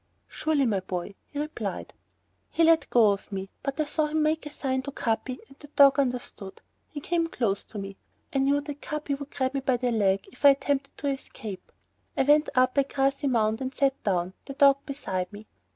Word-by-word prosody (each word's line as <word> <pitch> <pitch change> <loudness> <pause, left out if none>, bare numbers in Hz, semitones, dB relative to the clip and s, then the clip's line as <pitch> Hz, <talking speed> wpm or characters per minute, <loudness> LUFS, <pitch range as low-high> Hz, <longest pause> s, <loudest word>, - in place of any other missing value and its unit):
"Surely, 310 -3 0
my 210 -5 +1
boy," 185 +1 -5
he 290 - -10
replied. 300 +1 -4 0.6
He 335 - +1
let 330 0 +4
go 225 -4 +5
of 200 +1 -5
me, 195 0 -5
but 275 +2 -4
I 310 - +2
saw 305 +1 0
him 310 0 0
make 310 0 0
a - - -5
sign 260 -3 -2
to 280 - -6
Capi 250 0 -2
and 275 - -19
the 295 - -12
dog 280 -1 +6
understood. 245 -7 -3 0.3
He 295 - -6
came 335 +3 0
close 215 -10 -1
to 215 - -9
me. 195 -1 -6 0.4
I 275 - +2
knew 280 +2 +3
that 290 0 -8
Capi 300 -1 -3
would 280 0 -5
grab 260 -2 -1
me 275 - 0
by 260 -2 +1
the 245 0 0
leg 200 -3 +1
if 250 - -18
I 285 - +10
attempted 275 0 0
to 285 - -3
escape. 235 -7 -7 0.5
I - - +4
went 295 +3 +4
up 255 +2 +3
a - - +7
high 275 - -5
grassy 275 +1 +1
mound 220 -3 +1
and 260 0 -4
sat 275 -1 +1
down, 185 -2 0
the 275 - -7
dog 275 0 +6
beside 190 -10 -3
me. 210 +1 -10
270 Hz, 215 wpm, -27 LUFS, 220-285 Hz, 0.6 s, I